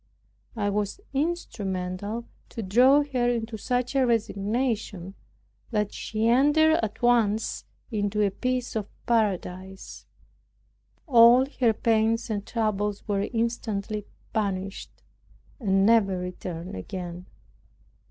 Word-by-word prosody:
I 205 Hz, -2 st, 0 dB
was 205 Hz, -, -2 dB
instrumental 210 Hz, -, -3 dB, 0.2 s
to 225 Hz, -, -6 dB
draw 255 Hz, +9 st, +5 dB
her 255 Hz, -4 st, 0 dB
into 230 Hz, -1 st, -2 dB
such 245 Hz, +4 st, -1 dB
a 270 Hz, -, +4 dB
resignation, 220 Hz, -4 st, -1 dB, 0.6 s
that 210 Hz, -3 st, -1 dB
she 215 Hz, +1 st, -2 dB
entered 295 Hz, +6 st, +4 dB
at 220 Hz, +1 st, -4 dB
once 225 Hz, -3 st, +2 dB, 0.3 s
into 210 Hz, -1 st, 0 dB
a 200 Hz, -, 0 dB
peace 250 Hz, +4 st, -2 dB
of 210 Hz, -2 st, -2 dB, 0.2 s
paradise; 190 Hz, -4 st, -2 dB, 1.0 s
all 245 Hz, -1 st, +7 dB
her 235 Hz, -4 st, +4 dB
pains 225 Hz, +1 st, +1 dB
and 205 Hz, -2 st, -2 dB
troubles 210 Hz, -3 st, -1 dB
were 200 Hz, -1 st, 0 dB
instantly 220 Hz, -3 st, -2 dB, 0.3 s
banished; 195 Hz, -2 st, -3 dB, 0.6 s
and 195 Hz, -4 st, +2 dB
never 205 Hz, -4 st, +4 dB
returned 180 Hz, -, -6 dB
again. 175 Hz, -, -6 dB
215 Hz, 105 wpm, -26 LUFS, 195-240 Hz, 1.0 s, all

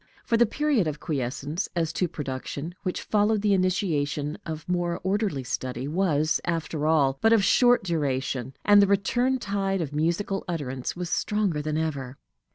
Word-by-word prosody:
For 230 Hz, -, +2 dB
the 235 Hz, 0 st, +4 dB
period 275 Hz, -, +1 dB
of 150 Hz, -1 st, -3 dB
quiescence 145 Hz, -, -3 dB
as 165 Hz, -1 st, 0 dB
to 180 Hz, -, 0 dB
production, 145 Hz, +2 st, -5 dB
which 185 Hz, -, -3 dB
followed 210 Hz, 0 st, +2 dB
the 205 Hz, -1 st, +3 dB
initiation 160 Hz, -6 st, 0 dB
of 160 Hz, -1 st, -6 dB
more 175 Hz, -1 st, -1 dB
orderly 190 Hz, -7 st, 0 dB
study, 130 Hz, +1 st, -3 dB
was, 155 Hz, -2 st, +1 dB
after 160 Hz, -2 st, -2 dB
all, 140 Hz, -4 st, +3 dB
but 225 Hz, -, +4 dB
of 220 Hz, -3 st, +4 dB
short 245 Hz, +4 st, +4 dB
duration, 135 Hz, -6 st, -2 dB
and 205 Hz, 0 st, +7 dB
the 200 Hz, -, +4 dB
return 240 Hz, +7 st, +2 dB
tide 195 Hz, -4 st, -1 dB
of 150 Hz, -4 st, -3 dB
musical 170 Hz, +6 st, 0 dB
utterance 135 Hz, -7 st, -3 dB
was 175 Hz, -1 st, -5 dB
stronger 205 Hz, -8 st, 0 dB
than 155 Hz, +1 st, -2 dB
ever. 140 Hz, -5 st, -3 dB
170 Hz, 165 wpm, -26 LUFS, 145-200 Hz, -, and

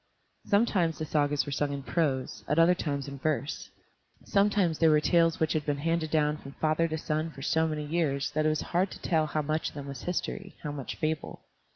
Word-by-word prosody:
Sometimes 200 Hz, -6 st, +2 dB
the 155 Hz, -, -3 dB
Sagas 145 Hz, -1 st, +1 dB
were 145 Hz, -, -5 dB
sung 145 Hz, +1 st, 0 dB
in 140 Hz, -1 st, -4 dB
prose, 135 Hz, -5 st, -1 dB
at 150 Hz, -, 0 dB
other 165 Hz, +2 st, +6 dB
times 140 Hz, -5 st, -3 dB
in 140 Hz, -1 st, -7 dB
verse. 150 Hz, 0 st, -2 dB, 0.6 s
Sometimes 200 Hz, -5 st, +2 dB
they 165 Hz, -, +5 dB
were 155 Hz, -1 st, +6 dB
tales 165 Hz, +1 st, +3 dB
which 160 Hz, -, +1 dB
had 155 Hz, -, 0 dB
been 145 Hz, -1 st, -1 dB
handed 165 Hz, +1 st, 0 dB
down 150 Hz, -1 st, +2 dB
from 140 Hz, -2 st, -11 dB
father 155 Hz, +2 st, +1 dB
to 160 Hz, -1 st, -3 dB
son 155 Hz, +1 st, -1 dB
for 135 Hz, -4 st, -10 dB
so 160 Hz, +3 st, +2 dB
many 150 Hz, -1 st, -3 dB
years 145 Hz, -3 st, 0 dB
that 155 Hz, 0 st, +1 dB
it -, -, +4 dB
was 155 Hz, -2 st, 0 dB
hard 180 Hz, +3 st, 0 dB
to -, -, -10 dB
tell 160 Hz, -3 st, +2 dB
how 150 Hz, 0 st, -1 dB
much 155 Hz, +2 st, -1 dB
of -, -, -18 dB
them 145 Hz, -1 st, -6 dB
was 140 Hz, -2 st, -7 dB
history, 190 Hz, +1 st, -3 dB
how 150 Hz, -, -3 dB
much 140 Hz, -3 st, -5 dB
fable. 155 Hz, 0 st, -3 dB
155 Hz, 225 wpm, -29 LUFS, 145-165 Hz, 0.6 s, other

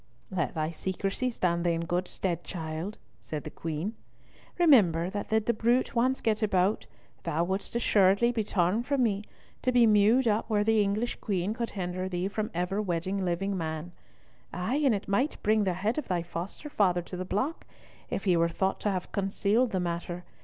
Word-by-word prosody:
"Let 170 Hz, -8 st, -1 dB
thy 155 Hz, 0 st, -1 dB
secrecy 195 Hz, +8 st, -2 dB
stand 170 Hz, -7 st, 0 dB
thee 175 Hz, -1 st, +2 dB
in 165 Hz, -, -1 dB
good 180 Hz, +2 st, -1 dB
stead, 180 Hz, -2 st, -3 dB
child," 165 Hz, +3 st, -5 dB, 0.2 s
said 150 Hz, -2 st, -5 dB
the 155 Hz, -, -7 dB
Queen. 165 Hz, +6 st, -3 dB, 0.6 s
"Remember 190 Hz, -, +5 dB
that 205 Hz, 0 st, -4 dB
did 220 Hz, -1 st, +2 dB
the 235 Hz, -, +2 dB
bruit 235 Hz, +3 st, +1 dB
once 255 Hz, +2 st, +1 dB
get 215 Hz, -1 st, +1 dB
abroad, 200 Hz, -1 st, +1 dB, 0.3 s
thou 165 Hz, 0 st, 0 dB
wouldest 190 Hz, +5 st, -3 dB
assuredly 205 Hz, 0 st, +4 dB
be 230 Hz, -3 st, -1 dB
torn 190 Hz, +2 st, +1 dB
from 265 Hz, +1 st, +1 dB
me, 205 Hz, -3 st, 0 dB, 0.4 s
to 255 Hz, -, +1 dB
be 245 Hz, -1 st, +5 dB
mewed 220 Hz, +4 st, +5 dB
up 220 Hz, +1 st, +1 dB
where 210 Hz, -2 st, +2 dB
the 220 Hz, 0 st, +3 dB
English 210 Hz, +4 st, 0 dB
Queen 195 Hz, -1 st, -1 dB
could 235 Hz, 0 st, -3 dB
hinder 185 Hz, 0 st, -2 dB
thee 180 Hz, 0 st, -1 dB
from 215 Hz, +2 st, -2 dB
ever 180 Hz, +4 st, -1 dB
wedding 190 Hz, +1 st, -1 dB
living 190 Hz, +3 st, -1 dB
man. 160 Hz, 0 st, -4 dB, 0.6 s
Ay, 180 Hz, +10 st, -1 dB
and 260 Hz, -6 st, +4 dB
it 200 Hz, -, -5 dB
might 250 Hz, +10 st, +1 dB
bring 215 Hz, 0 st, +3 dB
the 185 Hz, -, +1 dB
head 210 Hz, -, -1 dB
of -, -, -6 dB
thy 175 Hz, -3 st, 0 dB
foster 175 Hz, -, -6 dB
father 185 Hz, -10 st, +2 dB
to 180 Hz, -, -8 dB
the 180 Hz, -, -3 dB
block, 210 Hz, -, -2 dB, 0.4 s
if -, -, -3 dB
he 185 Hz, -3 st, +3 dB
were 170 Hz, 0 st, +3 dB
thought 190 Hz, +3 st, -1 dB
to 210 Hz, -, 0 dB
have 185 Hz, -2 st, -3 dB
concealed 200 Hz, +5 st, +1 dB
the 190 Hz, -, -1 dB
matter. 175 Hz, 0 st, -3 dB
195 Hz, 195 wpm, -29 LUFS, 175-220 Hz, 0.6 s, Remember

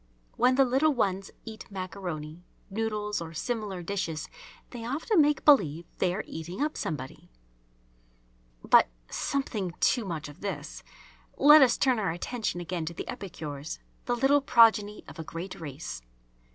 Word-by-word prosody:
When 250 Hz, +2 st, +4 dB
the 270 Hz, 0 st, +5 dB
little 270 Hz, +4 st, +2 dB
ones 195 Hz, -4 st, 0 dB, 0.2 s
eat 220 Hz, -1 st, -9 dB
maccaroni, 175 Hz, -5 st, -6 dB, 0.3 s
noodles, 210 Hz, -2 st, -2 dB
or 165 Hz, -1 st, -7 dB
similar 210 Hz, -3 st, -3 dB
dishes, 170 Hz, -4 st, -3 dB, 0.4 s
they 240 Hz, -2 st, -7 dB
often 310 Hz, -, +2 dB
make 295 Hz, -1 st, +2 dB
believe 170 Hz, -, +5 dB
they 180 Hz, -, +2 dB
are 215 Hz, -, -3 dB
eating 165 Hz, +5 st, -7 dB
up 300 Hz, +2 st, 0 dB
somebody. 135 Hz, -4 st, -5 dB, 1.3 s
But, -, -, +6 dB, 0.2 s
"something 215 Hz, -10 st, -2 dB
too 245 Hz, -, +3 dB
much 165 Hz, -6 st, -4 dB
of 145 Hz, -, -13 dB
this." 155 Hz, -8 st, -5 dB, 0.6 s
Let 295 Hz, +2 st, +8 dB
us 250 Hz, -3 st, +5 dB
turn 255 Hz, -4 st, +2 dB
our 195 Hz, -, 0 dB
attention 175 Hz, +3 st, -3 dB
again 175 Hz, -1 st, -3 dB
to 170 Hz, -, -5 dB
the -, -, -6 dB
epicures, 160 Hz, -, -6 dB, 0.3 s
the 245 Hz, -, 0 dB
little 270 Hz, +4 st, +4 dB
progeny 220 Hz, -5 st, +4 dB
of -, -, -11 dB
a -, -, -3 dB
great 170 Hz, +4 st, -7 dB
race. 145 Hz, -, -6 dB
200 Hz, 150 wpm, -28 LUFS, 165-245 Hz, 1.3 s, Let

